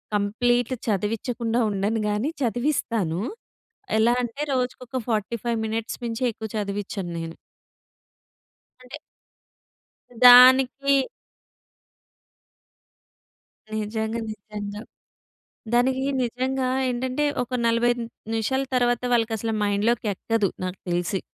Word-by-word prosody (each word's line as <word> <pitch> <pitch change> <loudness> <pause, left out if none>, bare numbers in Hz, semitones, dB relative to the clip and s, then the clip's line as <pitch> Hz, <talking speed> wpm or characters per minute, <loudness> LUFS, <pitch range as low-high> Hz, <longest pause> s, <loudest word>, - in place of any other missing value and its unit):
Complete 240 +4 +1
చదివిచ్చకుండా 225 +3 -1
ఉండను 205 +3 0
గాని 210 +7 0
చదివిస్తాను. 230 - 0 0.8
ఎలా 230 +2 +4
అంటే 240 +4 -5
రోజుకొక 255 0 -2
45 225 +2 -1
మినిట్స్ 225 +1 -3
మించి 230 +2 -3
ఎక్కువ 220 0 -7
చదివిచ్చను 200 -2 -4
నేను. 165 0 -6 1.5
అంటే 250 +2 -9 1.3
దానికి 260 +2 +7 2.7
నిజంగా, 220 +1 -2
నిజంగా. 205 0 -7 0.9
దానికి 260 +2 +2 0.2
నిజంగా 255 +2 -1 0.2
ఏంటంటే, 255 +4 -1 0.2
ఒక 255 - -10
45 235 +1 +2 0.3
నిమిషాల 225 +5 0
తర్వాత, 245 -1 +2
వాళ్ళకి 225 -1 +2
అసలు 225 +1 -2
మైండ్‌లోకి 210 +3 +1
ఎక్కదు 225 +1 0 0.2
నాకు 185 +1 -4
తెలిసి. 175 +2 0
230 Hz, 85 wpm, -24 LUFS, 210-250 Hz, 2.7 s, దానికి